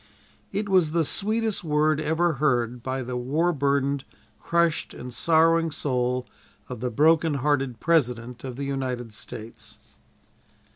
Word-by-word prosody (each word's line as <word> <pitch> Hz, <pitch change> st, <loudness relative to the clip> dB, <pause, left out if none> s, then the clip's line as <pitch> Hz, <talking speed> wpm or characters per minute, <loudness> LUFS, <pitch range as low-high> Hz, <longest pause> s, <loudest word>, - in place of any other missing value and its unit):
It 205 Hz, 0 st, -2 dB
was 180 Hz, -5 st, +3 dB
the 165 Hz, -2 st, +2 dB
"sweetest 215 Hz, +4 st, -1 dB
word 155 Hz, -1 st, +2 dB
ever 160 Hz, +2 st, +1 dB
heard" 125 Hz, -4 st, +1 dB
by 130 Hz, +1 st, -3 dB
the 125 Hz, +1 st, -5 dB
war 150 Hz, +8 st, +1 dB
burdened, 140 Hz, -1 st, 0 dB, 0.4 s
crushed 170 Hz, -2 st, +1 dB
and 125 Hz, 0 st, -8 dB
sorrowing 165 Hz, +4 st, +3 dB
soul 125 Hz, -4 st, -1 dB, 0.4 s
of -, -, -7 dB
the 125 Hz, +2 st, -2 dB
broken 155 Hz, +5 st, +3 dB
hearted 135 Hz, -3 st, 0 dB
President 125 Hz, -7 st, 0 dB
of 130 Hz, -2 st, -5 dB
the 140 Hz, +2 st, -4 dB
United 130 Hz, -4 st, -3 dB
States. 110 Hz, +2 st, -9 dB
140 Hz, 135 wpm, -25 LUFS, 125-165 Hz, 0.4 s, was